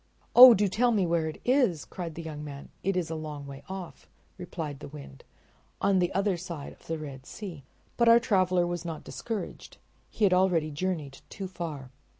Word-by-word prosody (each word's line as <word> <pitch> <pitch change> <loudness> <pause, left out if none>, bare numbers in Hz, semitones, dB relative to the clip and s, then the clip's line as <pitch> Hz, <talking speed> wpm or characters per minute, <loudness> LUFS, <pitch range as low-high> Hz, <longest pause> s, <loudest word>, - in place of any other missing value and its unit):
"Oh, 250 -1 +12
do 205 +1 +2
tell 235 +6 +2
me 210 -5 +2
where 165 -1 +1
it 155 - -6
is," 245 - +2
cried 170 -4 -6
the 165 - -6
young 150 -2 -6
man." 140 -1 -8
"It 195 0 0
is 170 -3 -2
a - - -2
long 150 -2 -6
way 140 0 -9
off," 190 -3 -8 0.3
replied 160 -6 -6
the - - -8
Wind, 140 - -11 0.6
"on 195 -1 +3
the 175 -1 +1
other 195 -1 +1
side 170 -5 -7
of - - -22
the 165 - -2
Red 135 -4 -9
Sea." 185 -9 -8 0.4
But 235 -1 +5
our 230 0 +8
traveler 185 -6 +2
was 175 0 -3
not 165 -2 -6
discouraged—he 225 0 -7
had 195 -3 +5
already 180 -4 +2
journeyed 150 -3 -3
too 195 - -6
far. 160 -8 -6
175 Hz, 190 wpm, -28 LUFS, 155-195 Hz, 0.6 s, Oh